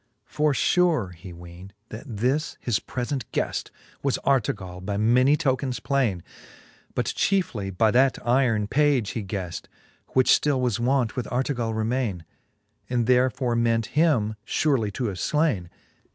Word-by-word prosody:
XXXIV. - - -40
For 150 -1 +2
fure 165 - +2
he 90 +2 -11
weend, 85 +3 -12 0.2
that 110 - -8
this 130 +7 -1
his 120 -4 0
prefent 125 -1 -4
gueft - - -2 0.3
Was 140 -2 0
Artegall, 100 -9 0
by 100 +1 -2
many 125 +7 +4
tokens 130 -4 -1
plaine; 120 -11 0 0.7
But - - 0
chiefly 150 - 0
by 110 +3 +2
that 130 +3 +4
yron 120 -4 +1
page 135 -4 +2
he 110 - -4
gheft, 95 -3 -5 0.5
Which 130 -1 +4
ftili 145 -3 +3
was 125 -3 0
wont 125 -1 +1
with 125 - -3
Artegall 120 -3 -1
remaine; 110 -6 -2 0.6
And 120 -2 +1
therefore 125 0 +2
ment 115 -1 +1
him 125 -10 +2
furely 125 -5 0
to 125 - -3
have 100 -5 -3
flaine. 145 - 0
120 Hz, 145 wpm, -25 LUFS, 105-135 Hz, 0.7 s, many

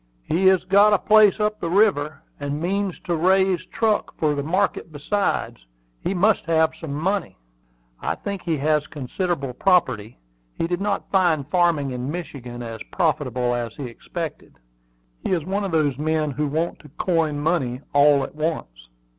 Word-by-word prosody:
"He 180 +4 +2
has 190 -1 +5
got 200 +3 +5
a - - +6
place 215 +1 +5
up 210 0 0
the 170 - -3
river, 170 -7 +2 0.2
and 145 0 -3
means 195 +2 -1
to 175 - -1
raise 190 +2 +2
truck 220 -2 0
for 155 -2 +1
the 145 - -2
market 175 +2 -1
besides. 150 - -2 0.4
He 195 - -1
must 205 +1 +2
have 160 -1 +2
some 160 -3 -6
money." 185 - -1 0.6
"I - - -2
think 200 -2 -5
he 165 -3 -1
has 150 +1 +1
considerable 145 -1 -3
property. 125 - +1 0.4
He - - 0
did 175 +2 -2
not 200 0 -2
find 170 -8 +2
farming 165 -5 +2
in 125 +1 -4
Michigan 135 -7 -6
as 115 -1 -7
profitable 130 -8 0
as 120 -2 -3
he 145 - -7
expected. 155 +7 -7 0.7
He - - 0
is 170 -4 -1
one 200 +3 -1
of 195 - -3
those 145 -4 +1
men 155 -1 0
who 150 +2 -1
want 160 +4 -2
to 150 - -15
coin 165 -5 +1
money 145 -5 0
all 145 -1 +5
at - - -6
once." 105 - -4
160 Hz, 170 wpm, -23 LUFS, 145-185 Hz, 0.7 s, a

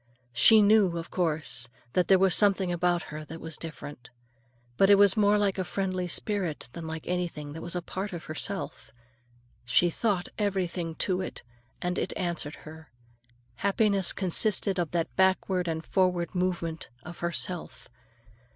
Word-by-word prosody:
She 215 - +7
knew, 200 -4 +4
of 165 - -6
course, 155 -8 0 0.3
that 180 - +2
there 190 - +6
was 190 -1 +3
something 195 -3 +3
about 175 0 +1
her 155 0 -6
that 160 +2 -9
was 160 -1 -6
different. 145 -6 -9 0.7
But 195 +9 +4
it 200 - +9
was 200 -1 +5
more 210 -1 +4
like 200 -2 0
a - - +1
friendly 185 0 -2
spirit 175 - -2
than 165 -1 -7
like 160 0 -6
anything 170 -5 -3
that 160 - -7
was 170 +1 -5
a 175 - -2
part 190 +3 -5
of 170 -3 -6
herself. 185 +5 -3 0.7
She 170 +9 +3
thought 195 -2 -1
everything 180 -5 -1
to 185 -1 0
it, 185 - -7 0.4
and 180 0 -1
it - - -2
answered 170 -4 -2
her; 160 +1 -11 0.7
happiness 200 -2 +2
consisted 195 +1 +2
of 170 -3 0
that 170 -2 -2
backward 190 -1 +2
and 160 0 -3
forward 180 -2 +1
movement 175 -3 -2
of 175 +2 -10
herself. 170 0 -3
180 Hz, 160 wpm, -28 LUFS, 165-195 Hz, 0.7 s, it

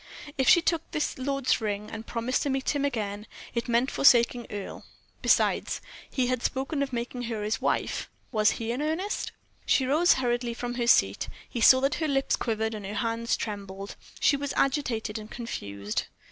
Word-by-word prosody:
If 265 -2 +2
she 345 - +7
took 335 -3 +2
this 300 -3 -2
lord's 275 -2 +1
ring, 210 -1 -3
and 225 0 -7
promised 240 +2 -1
to 285 - -1
meet 270 0 0
him 285 - 0
again, 210 -6 -2 0.3
it 235 -1 -2
meant 240 +3 +2
forsaking 240 -2 +4
Earle. 205 -1 -6 0.4
Besides, - - +2 0.3
he 255 - 0
had 250 -1 0
spoken 270 +4 -1
of 275 -1 -1
making 245 +1 -3
her 225 -2 -3
his 215 +2 -1
wife. - - -1 0.2
Was 215 -3 +3
he 230 0 -3
in 250 +4 -2
earnest? 325 +7 -2 0.3
She 265 - +3
rose 310 +7 +5
hurriedly 240 -2 -1
from 245 0 -4
her 240 -1 -1
seat. 95 - +3 0.2
He 235 - -4
saw 260 +2 +8
that 275 +2 +2
her 315 - +1
lips 275 -2 +1
quivered 220 -1 -1
and 210 -1 -6
her 200 +2 -5
hands 230 +1 0
trembled; 200 -2 -6 0.2
she - - +4
was 285 0 -3
agitated 245 -6 0
and 215 0 -10
confused. 100 - -4
240 Hz, 185 wpm, -28 LUFS, 220-270 Hz, 0.4 s, saw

